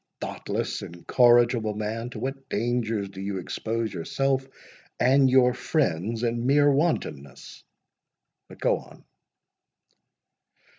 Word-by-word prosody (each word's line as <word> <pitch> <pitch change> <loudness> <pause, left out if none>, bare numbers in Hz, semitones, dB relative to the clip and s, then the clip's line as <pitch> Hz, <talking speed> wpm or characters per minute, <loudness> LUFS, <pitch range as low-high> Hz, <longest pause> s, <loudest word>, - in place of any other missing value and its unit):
"Thoughtless, - - -4
incorrigible 120 +4 +3
man! 110 +3 -3
to - - -8
what 135 0 -5
dangers 115 -2 -1
do 95 0 -9
you 100 0 -3
expose 110 +4 -3
yourself 135 +9 -1 0.5
and 135 +2 +4
your 125 -1 +5
friends, 115 - -1
in 120 +1 -1
mere 145 +1 +5
wantonness!—But 135 - -5
go - - +2
on." - - -17
120 Hz, 100 wpm, -26 LUFS, 105-130 Hz, 0.5 s, your